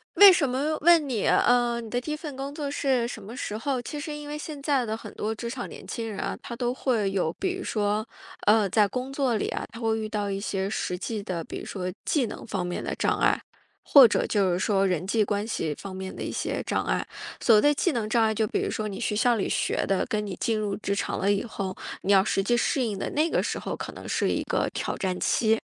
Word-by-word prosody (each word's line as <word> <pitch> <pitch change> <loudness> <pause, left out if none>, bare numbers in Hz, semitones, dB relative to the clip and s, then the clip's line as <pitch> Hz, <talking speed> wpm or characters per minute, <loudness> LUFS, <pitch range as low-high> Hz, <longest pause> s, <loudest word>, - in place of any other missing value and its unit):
为 400 -1 +11
什 330 -5 +3
么 290 +5 0
问 330 -2 +6
你， 235 -6 -1
呃， 240 -1 +3
你 225 - -8
的 245 +2 0
第 305 - -5
1 300 - 0
份 300 -3 -7
工 275 +2 -5
作 290 -2 -3
是 265 -4 +1
什 225 -2 -7
么 215 +5 -9
时 215 -5 -4
候？ 255 +2 -1
其 295 +4 -6
实 305 0 -5
因 295 0 -8
为 300 0 -4
现 300 -1 -7
在 275 -3 +1
的 220 -1 -2
很 - - -10
多 220 +1 -2
职 235 +1 -5
场 245 0 -4
年 - - -10
轻 230 -2 -4
人 200 - -6
啊， - - -3
他 235 - -6
都 245 0 -1
会 230 -7 0
有， 180 -5 0
比 375 -1 -2
如 380 - -6
说， 210 +1 0 0.4
呃， 210 -1 +5
在 210 +2 +4
工 255 +4 -4
作 270 -4 +1
里 215 - -1
呀， - - -3
他 230 - -9
会 225 -1 +1
遇 220 -1 -3
到 205 -2 -2
一 195 0 -2
些 195 -1 -2
实 180 -4 -2
际 205 +3 -4
的， 175 -4 -3
比 - - -6
如 - - -8
说 185 -2 -4
技 285 -5 +2
能 - - -7
方 190 -5 -2
面 180 - -3
的 - - -3
障 - - +1
碍， - - +3 0.4
或 275 -4 +9
者 - - +1
就 195 -3 +2
是 175 - 0
说 195 -1 +2
人 180 -2 0
际 215 +2 +3
关 205 0 -1
系 165 -9 -2
方 195 -1 -7
面 190 0 -6
的 - - -7
一 - - -3
些 - - -2
障 - - -1
碍。 - - 0 0.4
所 225 - +6
谓 210 - +6
的 295 +4 +5
技 345 +5 +1
能 225 -6 -2
障 230 0 +3
碍， 220 0 +2
就 220 +1 +1
比 - - -1
如 - - -1
说 215 -1 -2
你 195 -1 -6
学 215 -3 -1
校 240 +2 +3
里 205 - -1
学 - - 0
的 195 - +1
跟 210 -1 -1
你 195 -3 -5
进 225 -3 +1
入 205 -2 -1
职 200 -1 -2
场 200 - -2
了 200 +1 +2
以 200 - +1
后， 195 -5 -4 0.3
你 195 - 0
要 195 -1 +6
实 195 -1 0
际 240 +4 +2
适 260 +3 +1
应 210 -4 -2
的 - - -3
那 310 +3 +2
个 - - +2
时 - - -2
候 - - -4
可 - - -6
能 - - -10
是 - - +1
一 - - 0
个 - - 0
挑 - - -2
战 185 -1 -2
期。 225 -1 +2
220 Hz, 290 characters per minute, -26 LUFS, 200-260 Hz, 0.4 s, 为